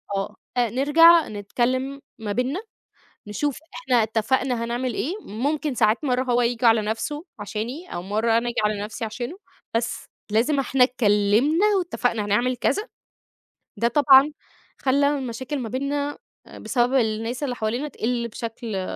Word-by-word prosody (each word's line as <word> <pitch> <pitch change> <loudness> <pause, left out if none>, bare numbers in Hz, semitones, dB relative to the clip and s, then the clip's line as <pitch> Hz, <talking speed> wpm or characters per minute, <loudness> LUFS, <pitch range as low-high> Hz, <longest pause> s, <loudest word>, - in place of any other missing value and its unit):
آه، 195 0 -3 0.2
آآ، 240 -2 +2
نرجع 315 +7 +6
نتكلّم 255 +6 -2 0.2
ما 215 -2 -4
بيننا، 255 - -1 0.7
نشوف 270 +7 -2 0.2
إحنا 250 - +2
اتّفقنا 230 +2 0
هنعمل 240 +1 -2
إيه، 300 - -2
ممكن 285 - -2
ساعات 215 +4 +2
مرّه 255 -2 +1
هو 245 -1 +1
ييجي 240 0 0
على 225 -1 +5
نَفْسُه، 230 +9 -3
عشاني 230 - -5
أو 175 - -3
مرّه 220 +4 +1
أنا 235 - -1
آجي 235 - -6
على 210 -1 -1
نَفْسي 220 +3 -5
عشانُه، 240 +9 -5 0.4
بس 230 0 -2 0.3
لازم 245 +7 +2
إحنا 265 -1 +3
اتكلّمنا 245 - +3
واتفقنا 245 - -1
هنعمل 240 +5 +1
كذا، 415 - 0 0.9
ده 235 - +2
طبعًا، 275 +2 +6 0.5
خلى 280 +2 +2
المشاكل 260 +3 -4
ما 240 -4 -4
بيننا، 285 +4 -2 0.3
آآ، - - -12
بسبب 245 0 0
الناس 225 +1 0
اللي 265 -4 -1
حوالينا 240 +6 -2
تقِلّ 235 -3 -2
بشكل 230 -1 -6
آآ، 185 -1 -3
245 Hz, 150 wpm, -23 LUFS, 225-275 Hz, 0.9 s, نرجع